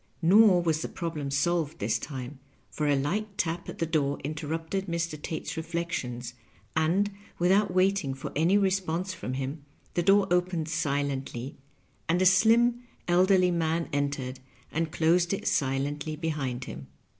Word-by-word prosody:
Nor 190 0 +6
was 160 -2 +1
the - - -2
problem 160 -5 -4
solved 155 +2 0
this 105 +2 0
time, 135 -1 -7 0.3
for 150 - -1
a 145 - +4
light 195 +9 -2
tap 170 +1 -2
at - - -7
the 165 - 0
door 150 -3 0
interrupted 160 +6 -3
Mr. 170 -3 -2
Tate's 160 - -4
reflections, 160 -8 -4 0.4
and, 175 +6 +2 0.3
with 175 +1 +2
out 200 0 +3
waiting 185 -6 +2
for 135 - -6
any 170 +7 +4
response 185 -2 0
from 130 -7 -5
him, 135 +3 -4 0.3
the 175 - +1
door 195 +3 +5
opened 180 -3 +1
silently, 140 -4 -2 0.5
and 170 +2 +3
a 185 - +3
slim, 230 +6 +5 0.3
elderly 185 +1 +4
man 165 -1 0
entered, 140 -3 -2 0.3
and 160 0 -1
closed 170 +3 +2
it 195 - -3
silently 145 +3 0
behind 145 -6 -3
him. 65 +2 -8
165 Hz, 150 wpm, -28 LUFS, 145-180 Hz, 0.5 s, Nor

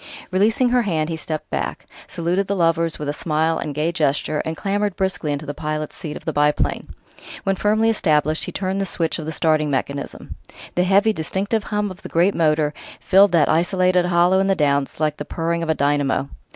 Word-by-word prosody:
Releasing 220 +6 +2
her 250 0 +3
hand, 165 -7 -1
he 165 - -2
stepped 155 -1 -5
back, 70 -1 -3 0.2
saluted 180 +3 -1
the 200 - -1
lovers 165 -2 +1
with 150 - -5
a 145 - -1
smile 160 +1 0
and 145 -2 -4
gay 155 +3 0
gesture, 150 -1 0
and 160 0 -3
clambered 205 +1 -1
briskly 180 -6 -1
to 150 - -9
the 145 - -4
pilot's 155 0 -4
seat 155 -5 -6
of - - -14
the 160 - -2
biplane. 150 0 +1 0.6
When 195 -1 +1
firmly 215 +3 +2
established, 155 -6 +1
he - - -5
turned 190 0 -2
the - - 0
switch 165 -1 -2
of 155 - -6
the - - -2
starting 155 -1 +1
mechanism. 140 0 -4 0.4
The 180 - +1
heavy, 200 +4 +4
distinctive 200 +6 -2
hum 210 -1 -1
of 185 - -11
the - - -9
great 175 +4 +3
motor 155 -2 +1 0.3
filled 195 +2 +5
that 160 -4 +4
isolated 180 +2 +2
hollow 175 +2 +3
in 195 - +2
the 195 - +2
Downs 140 -4 0
like 155 -1 0
the - - -4
purring 170 +2 -2
of 165 - -3
a 160 - +2
dynamo. 140 -1 0
165 Hz, 205 wpm, -21 LUFS, 150-190 Hz, 0.6 s, filled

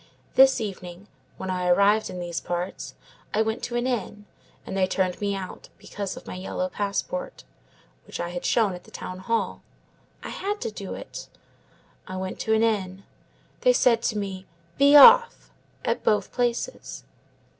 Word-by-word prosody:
This 265 0 +6
evening, 190 -3 -7 0.3
when 190 - -4
I 180 -1 -1
arrived 200 +4 +4
in 180 - -6
these 175 -1 -4
parts, 175 +2 -4 0.4
I 220 - +3
went 220 +1 -3
to 240 - -5
an 240 +1 0
inn, 220 -4 -3 0.4
and - - -6
they 190 -1 +2
turned 185 0 -1
me 200 -1 0
out, 190 -1 -8
because 200 -2 -6
of - - -11
my - - -7
yellow 185 0 -3
passport, 355 - -3 0.6
which - - -7
I 175 - -2
had 175 0 -5
shown 215 -5 +2
at 180 0 -10
the - - -16
town 185 0 -7
hall. 230 +4 -2 0.6
I - - -6
had 410 +2 -3
to 460 - -3
do - - -7
it. - - -9 0.8
I 185 -1 -6
went 185 0 -5
to 220 - 0
an 220 - +2
inn. 195 -4 -1 0.6
They - - +4
said 235 - +3
to 220 - -1
me, 195 -2 -5 0.3
'Be 280 +1 +5
off,' 470 - +8 0.3
at - - -1
both 205 -2 +1
places. 245 - -3
205 Hz, 170 wpm, -25 LUFS, 185-240 Hz, 0.8 s, off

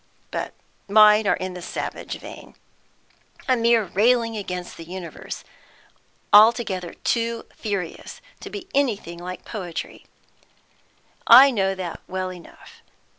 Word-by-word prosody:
But - - -4 0.3
mine 210 +1 +6
are - - +3
in 185 0 -5
the 180 - -8
savage - - -5
vein, - - -12 0.9
a 260 - +4
mere 230 -1 +3
railing 230 +4 +2
against 180 -4 -5
the 165 - -9
universe, 175 0 -8 0.9
altogether 210 -5 +4
too 230 -1 -1
furious 200 -6 -5 0.2
to - - -9
be 390 -3 -8
anything 215 -11 -1
like 180 +1 -8
poetry; 180 -7 -7 1.2
I 265 +4 +9
know 195 -4 0
that 180 -3 -6
well 185 0 -4
enough. 175 -2 -15
205 Hz, 120 wpm, -23 LUFS, 180-230 Hz, 1.2 s, I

